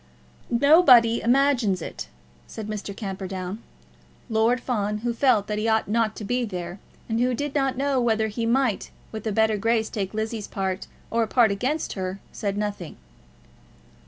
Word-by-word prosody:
"Nobody 250 -3 +6
imagines 245 -6 +2
it," - - -6 0.4
said 215 -2 -7
Mr. 210 -2 -5
Camperdown. 190 0 -5 0.7
Lord 225 +3 +3
Fawn, 210 -4 -1
who 240 - +1
felt 230 -4 +3
that 210 0 -2
he 220 - -1
ought 220 0 +2
not 220 0 +1
to - - -7
be 245 +4 0
there, 180 -3 -5 0.3
and 225 0 -1
who 250 0 +2
did 290 +3 -3
not 270 -3 0
know 275 -1 +1
whether 220 -2 +2
he 230 +2 -3
might 245 -3 +1 0.2
with 220 0 -5
a - - 0
better 220 +1 +2
grace 225 +1 +1
take 200 -2 -3
Lizzie's 220 -1 -3
part 190 -1 -3 0.2
or 230 - +2
a 225 - +1
part 230 -1 +4
against 260 +10 -1
her, 190 0 -4
said 200 -2 -3
nothing. 205 -5 -4
220 Hz, 165 wpm, -25 LUFS, 205-245 Hz, 0.7 s, Nobody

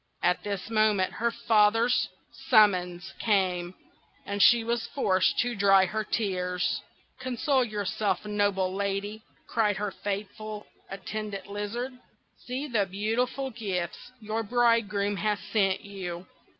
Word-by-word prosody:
At 180 - +2
this 205 +1 -4
moment 215 -4 +2
her 235 +2 0
father's 225 +2 +3 0.4
summons 190 -5 +4
came, 185 -4 +1 0.5
and 200 0 -2
she 235 +1 +7
was 235 0 -1
forced 190 -9 +1
to 245 0 -1
dry 195 -2 +5
her 215 +4 -2
tears. 180 -5 -1 0.4
"Console 260 +2 +1
yourself, 210 -1 -1
noble 205 -3 0
Lady!" 200 +2 -2 0.2
cried 210 -3 +1
her 205 0 -2
faithful 205 +2 -5 0.2
Attendant 200 0 -5
Lizard. 210 +6 -4 0.5
"See 255 +4 -3
the 215 -7 +1
beautiful 230 +7 -1
gifts 195 -2 -4
your 220 0 -2
bridegroom 215 -3 +2
has 210 +1 0
sent 195 -3 +1
you. 185 -3 -6
205 Hz, 120 wpm, -28 LUFS, 195-225 Hz, 0.5 s, she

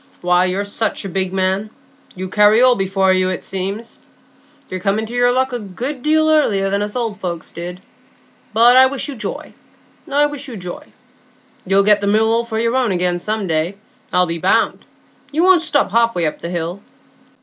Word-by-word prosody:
"Why, 180 +1 +3
you're 190 +2 -1
such 210 +1 -2
a - - -4
big 190 0 -1
man, 190 +2 -1 0.5
you 185 +1 -5
carry 210 +3 +4
all 255 0 +6
before 195 -1 +1
you, 185 0 +2
it, 185 - -4
seems. 195 +5 -5 0.7
You're 185 - -5
come 195 +3 0
into 220 +1 -4
your 245 0 +3
luck 260 +1 0
a 245 - -1
good 245 +7 -5
deal 315 +2 +2
earlier 210 -11 +2
than 200 +1 0
us 210 +2 -4
old 225 -4 -3
folks 170 -3 -5
did; 175 +2 -7 0.7
but 235 +3 +5
I 260 0 +7
wish 275 +2 -4
you 285 - -5
joy, 230 - -6 0.6
I 290 +1 +3
wish 290 -1 -5
you 240 -4 -7
joy. 180 -2 -8 0.8
You'll 195 +1 +4
get 210 0 +4
the 200 - -1
Mill 220 +2 +3
all 230 +1 +1
for 230 -1 -5
your 230 +2 0
own 255 -5 +1
again 180 -1 0
some 215 +2 -2
day, 165 +3 -1 0.3
I'll 180 0 +3
be 165 -1 -4
bound. - - +1 0.5
You 315 +4 +1
won't 370 -2 +5
stop 300 - +1
half 230 +1 +2
way 175 -2 0
up 155 - -3
the 170 - -5
hill." 175 +2 -4
205 Hz, 200 wpm, -18 LUFS, 185-245 Hz, 0.8 s, I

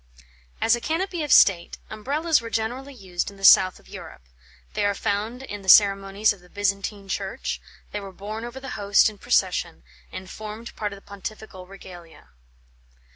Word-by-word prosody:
As 230 - +4
a 240 - -7
canopy 340 +5 -2
of 295 -3 -3
state, 175 -3 +5
Umbrellas 290 +8 0
were 230 - -7
generally 245 +5 -3
used 185 -6 -4
in 200 - -15
the 195 - -2
south 185 -1 +7
of - - -22
Europe; - - -11 0.5
they - - -1
are 200 0 +1
found 220 +7 -2
in 205 -5 -7
the 190 - -5
ceremonies 195 +1 +5
of 200 - -16
the 180 0 -20
Byzantine 200 0 -2
Church; 195 - -4 0.3
they 205 - -3
were 195 -1 -9
borne 210 +4 -7
over 240 +2 -7
the 270 - -8
Host 205 0 +3
in 205 - -17
procession, - - 0 0.3
and 185 - -8
formed 215 +3 -8
part 210 -1 -3
of 200 - -8
the 195 - -20
Pontifical 200 -1 -8
regalia. 180 -3 -13
205 Hz, 180 wpm, -24 LUFS, 195-230 Hz, 0.5 s, south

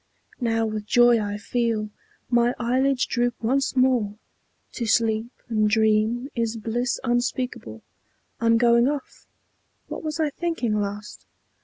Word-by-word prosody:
Now 225 -2 +1
with 215 -1 -4
joy 240 0 +5
I 205 0 -3
feel 220 -1 -1 0.4
My 240 +1 +3
eyelids 255 +2 +1
droop 240 -1 0
once 270 +5 0
more. 250 -5 +2 0.6
To 235 - -4
sleep 220 0 +2 0.2
and 215 -3 +1
dream 220 +4 +1
Is 230 -1 -2
bliss 235 +3 -2
unspeakable; 240 - -2 0.6
I'm 230 0 +3
going 235 +1 +4
off; 285 -1 -5 0.6
What - - -5
was 310 +1 -4
I 310 -2 +1
thinking 325 -8 -2
last? 210 0 -4
235 Hz, 130 wpm, -24 LUFS, 215-250 Hz, 0.6 s, joy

